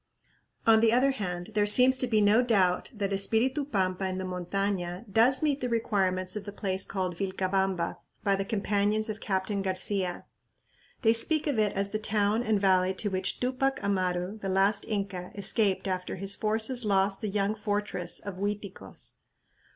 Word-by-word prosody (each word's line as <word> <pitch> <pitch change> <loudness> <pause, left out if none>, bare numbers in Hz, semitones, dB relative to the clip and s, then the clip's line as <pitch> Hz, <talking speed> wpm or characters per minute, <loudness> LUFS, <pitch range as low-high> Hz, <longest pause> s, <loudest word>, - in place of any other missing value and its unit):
On 225 -1 +6
the 225 0 +4
other 255 +4 +3
hand 180 -6 -5
there 210 -1 +2
seems 250 +5 +7
to 255 - +1
be 220 -3 +2
no 210 +3 +5
doubt 195 -7 +1
that 200 -4 -3
Espiritu 230 +8 +1
Pampa 190 -6 -1
in 185 0 -3
the 190 - -3
montaña 180 +1 -3
does 230 +8 +3
meet 290 -2 +1
the 250 - -1
requirements 190 -5 0
of 210 -2 -5
the 205 - -6
place 190 -2 -1
called 185 -2 -3
Vilcabamba 190 -1 -1 0.3
by 200 -1 +2
the 195 - -2
companions 210 +1 0
of 215 0 -4
Captain 195 +1 -1
Garcia. 190 -1 -2 0.8
They 225 0 +5
speak 300 +7 +2
of 285 -7 0
it 210 -2 +1
as 200 0 -1
the 215 - -3
town 210 +1 +1
and 220 -4 +1
valley 190 -1 +2
to 205 - -2
which 190 0 -2
Tupac 260 +2 0
Amaru, 185 0 -1
the 195 - -4
last 195 +2 +2
Inca, 195 -4 -4
escaped 200 -1 +1
after 185 -1 -3
his 195 +1 -4
forces 220 +4 +1
lost 195 -1 +1
the 215 - -2
"young 200 +1 0
fortress" 205 -4 -3
of 200 -2 -7
Uiticos. 200 - -4
200 Hz, 175 wpm, -28 LUFS, 190-220 Hz, 0.8 s, seems